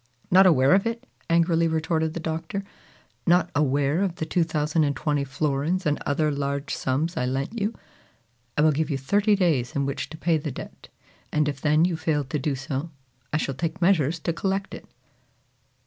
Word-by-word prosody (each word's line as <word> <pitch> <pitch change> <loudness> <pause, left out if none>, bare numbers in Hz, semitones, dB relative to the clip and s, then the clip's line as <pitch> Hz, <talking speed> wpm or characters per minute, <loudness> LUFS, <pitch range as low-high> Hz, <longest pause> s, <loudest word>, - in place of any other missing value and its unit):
"Not 190 +1 +7
aware 135 -4 +5
of 195 +3 +3
it!" 230 +2 -4 0.2
angrily 165 0 +3
retorted 160 0 0
the - - -2
Doctor. 165 +4 -3 0.6
"Not 175 +1 +4
aware 145 +3 +1
of 190 -4 0
the 160 - -3
2,020 150 -3 0
florins 145 +6 -1
and 150 -1 0
other 150 +1 +1
large 140 0 -2
sums 150 +7 -1
I 125 - 0
lent 140 - -3
you! 210 +3 -1 0.8
I 150 - +4
will 155 - +5
give 155 +2 -1
you 140 - 0
thirty 205 - +2
days 155 -11 +1
in 140 -1 +1
which 140 0 -3
to 160 - -9
pay 165 -1 +1
the 150 - -4
debt; 130 - -9 0.4
and 150 -1 +1
if 140 -2 -3
then 155 +2 +4
you 180 -2 0
fail 160 -3 0
to 140 +3 -3
do 140 +1 -1
so, 135 +4 -4 0.4
I 155 - +1
shall 140 -3 -2
take 160 +5 -3
measures 170 -4 +3
to 170 - -1
collect 195 +2 -2
it!" - - -9
155 Hz, 180 wpm, -25 LUFS, 140-170 Hz, 0.8 s, Not